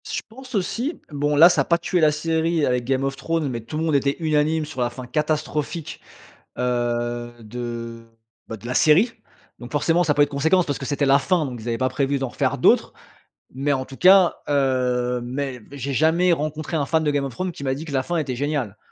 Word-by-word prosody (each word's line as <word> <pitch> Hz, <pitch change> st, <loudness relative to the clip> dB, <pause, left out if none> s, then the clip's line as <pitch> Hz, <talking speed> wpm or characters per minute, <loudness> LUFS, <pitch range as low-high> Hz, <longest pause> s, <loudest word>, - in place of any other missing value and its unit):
Je -, -, -2 dB
pense 255 Hz, +2 st, -10 dB
aussi. 235 Hz, -, -2 dB
Bon 145 Hz, 0 st, 0 dB
là 165 Hz, +4 st, +9 dB
ça -, -, +2 dB
a -, -, +2 dB
pas 170 Hz, -, +3 dB
tué 175 Hz, +2 st, -1 dB
la 155 Hz, -2 st, +5 dB
série, 160 Hz, +1 st, 0 dB
avec 125 Hz, -1 st, 0 dB
Game 135 Hz, +1 st, 0 dB
of 135 Hz, 0 st, -1 dB
Thrones, 165 Hz, +1 st, -2 dB
mais 120 Hz, -2 st, -4 dB
tout 120 Hz, +7 st, -7 dB
le 160 Hz, -, -1 dB
monde 160 Hz, -2 st, +1 dB
était 140 Hz, 0 st, +1 dB
unanime 155 Hz, 0 st, +1 dB
sur 150 Hz, -4 st, -6 dB
la 120 Hz, -, +1 dB
fin 125 Hz, +1 st, -9 dB
catastrophique, 150 Hz, +3 st, -2 dB, 0.6 s
heu, 120 Hz, -1 st, -1 dB
de 115 Hz, 0 st, -6 dB, 0.4 s
bah, 115 Hz, -, -6 dB
de 110 Hz, +2 st, -12 dB
la 125 Hz, -, -3 dB
série. 170 Hz, -, +5 dB, 0.5 s
Donc 120 Hz, 0 st, -10 dB
forcément 165 Hz, +4 st, +2 dB
ça 150 Hz, -, +2 dB
a -, -, -3 dB
pas 145 Hz, -, +4 dB
eu -, -, +4 dB
de -, -, -18 dB
conséquences, 160 Hz, +6 st, +2 dB
parce 145 Hz, -, -2 dB
que 135 Hz, -, -6 dB
c'était 145 Hz, 0 st, 0 dB
la 135 Hz, +1 st, +5 dB
fin. 175 Hz, +2 st, +1 dB
Donc 125 Hz, -3 st, -7 dB
ils 115 Hz, -, -7 dB
avaient 115 Hz, -1 st, -1 dB
pas 130 Hz, -, +1 dB
prévu 140 Hz, +1 st, -1 dB
d'en 135 Hz, -1 st, -2 dB
refaire -, -, -1 dB
d'autres. -, -, +3 dB, 0.6 s
Mais 140 Hz, +2 st, 0 dB
en 130 Hz, -1 st, -2 dB
tout 135 Hz, -, -12 dB
cas, 185 Hz, -1 st, +6 dB
heu 125 Hz, -3 st, +1 dB
mais 130 Hz, 0 st, -4 dB
j'ai 140 Hz, 0 st, -4 dB
jamais 165 Hz, +6 st, +3 dB
rencontré, 155 Hz, +1 st, -3 dB
un 145 Hz, -, 0 dB
fan 160 Hz, +2 st, +1 dB
de 150 Hz, -, +1 dB
Game 145 Hz, -1 st, 0 dB
of 135 Hz, -, -6 dB
Thrones 185 Hz, +7 st, -3 dB
qui 155 Hz, -, -10 dB
m'a 130 Hz, -1 st, 0 dB
dit 145 Hz, +4 st, -6 dB
que 155 Hz, -, -8 dB
la 135 Hz, -1 st, 0 dB
fin 175 Hz, +3 st, -2 dB
était 140 Hz, -5 st, -2 dB
géniale. 135 Hz, -6 st, -2 dB
145 Hz, 240 wpm, -22 LUFS, 125-160 Hz, 0.6 s, là